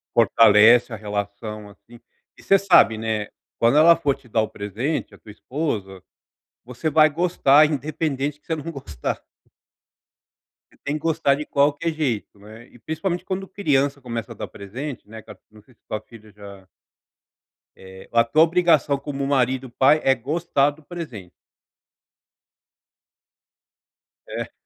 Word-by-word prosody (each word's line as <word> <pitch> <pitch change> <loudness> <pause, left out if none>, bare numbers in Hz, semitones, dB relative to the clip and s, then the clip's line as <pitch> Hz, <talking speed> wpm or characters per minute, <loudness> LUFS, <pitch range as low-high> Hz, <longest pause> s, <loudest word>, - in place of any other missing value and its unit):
Fortalece 115 +1 +5
a - - -4
relação, 105 0 -6
assim, 115 +4 -18 0.4
e - - -17
você 195 - +4
sabe, 185 - +4
né. 110 -2 -2 0.3
Quando 115 +5 +3
ela 165 +2 +7
for 145 -5 0
te 135 -2 -22
dar 110 -1 +1
o 110 - -2
presente, 110 - -4
a - - -14
tua 105 - -14
esposa, 105 - -4 0.6
você 125 +6 -4
vai 155 0 +5
gostar, 155 -2 +4
independente 145 -1 -3
que - - -39
você 165 - -1
não 160 +2 -6
gostar. 90 - -5 1.5
Você - - -26
tem 145 - -2
que - - -3
gostar 160 -3 +1
de 150 +2 -6
qualquer 145 +4 +1
jeito, 130 -10 -3
né, 110 +4 -14
e - - -19
principalmente 170 - -4
quando 195 0 -4
criança 145 -8 0
começa 115 -2 -6
a - - -20
dar - - -6
presente, 120 +6 -8
né, 110 +1 -9
ca - - -13
não 105 -1 -19
sei 130 - -24
se - - -40
sua 110 - -3
filha 110 0 -17
já 100 -2 -13 1.1
eh, 95 0 -14
a 115 0 +4
tua 155 +7 +4
obrigação 165 -4 +2
como 140 0 -5
marido, 130 -1 0
pai 135 +5 +3
é 135 - +4
gostar 145 +2 0
do 150 +2 -19
presente. 140 - -9 3.0
É. - - -6
135 Hz, 150 wpm, -22 LUFS, 110-155 Hz, 3.0 s, ela